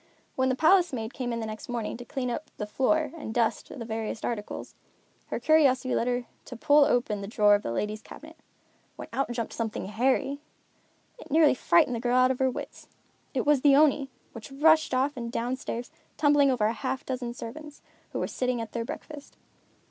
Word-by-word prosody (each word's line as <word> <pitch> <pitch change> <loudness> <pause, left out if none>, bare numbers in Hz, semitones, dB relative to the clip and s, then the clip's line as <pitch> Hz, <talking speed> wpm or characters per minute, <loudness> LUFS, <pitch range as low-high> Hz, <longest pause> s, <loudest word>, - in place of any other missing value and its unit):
When 260 0 +1
the 260 - +1
palace 350 +4 +4
maid 225 -1 -4
came 245 -2 -3
in 230 0 -3
next 220 +1 -6
morning 235 -3 -3
to 245 - -8
clean 250 0 -3
up 300 - -5
the 210 - -3
floor 285 +7 +1
and 295 -9 -6
dust 230 -1 0
the 240 -5 -7
various 220 -1 -4
articles, 215 -3 -4 0.5
her - - -3
curiosity 270 -5 +3
led 235 - +1
her 245 0 -1 0.2
to 250 - -8
pull 290 +3 +5
open 225 -6 0
the 200 - -6
drawer 210 -1 +4
of 205 - +3
the 115 - -4
ladies' 210 - -3
cabinet; - - -13 0.6
when - - -9
out 275 - -1
jumped 235 -2 -4
something 225 -4 -3
hairy. 260 +6 0 0.8
It 480 - -12
nearly 305 0 +5
frightened 245 -1 +3
the - - -3
girl 245 +1 +1
out 255 0 +5
of 260 - -3
her 260 0 +3
wits. 250 - -8 0.5
It 255 - 0
was 290 -2 +4
the 280 -1 +6
Oni, 285 -2 +4 0.2
which 230 +3 -10
rushed 310 0 +4
off 270 +3 +1
and 235 -2 -5
down 245 +2 -1
stairs, 245 -2 -6 0.3
tumbling 290 -2 +4
over 245 -5 +1
a 220 - +1
half 265 +4 -4
dozen 245 -2 -4
servants, 295 +6 -9 0.3
who - - -5
were - - -1
sitting 250 -1 -1
at 225 -1 -5
their 235 - -3
breakfast. 290 +4 -9
250 Hz, 200 wpm, -27 LUFS, 230-280 Hz, 0.8 s, the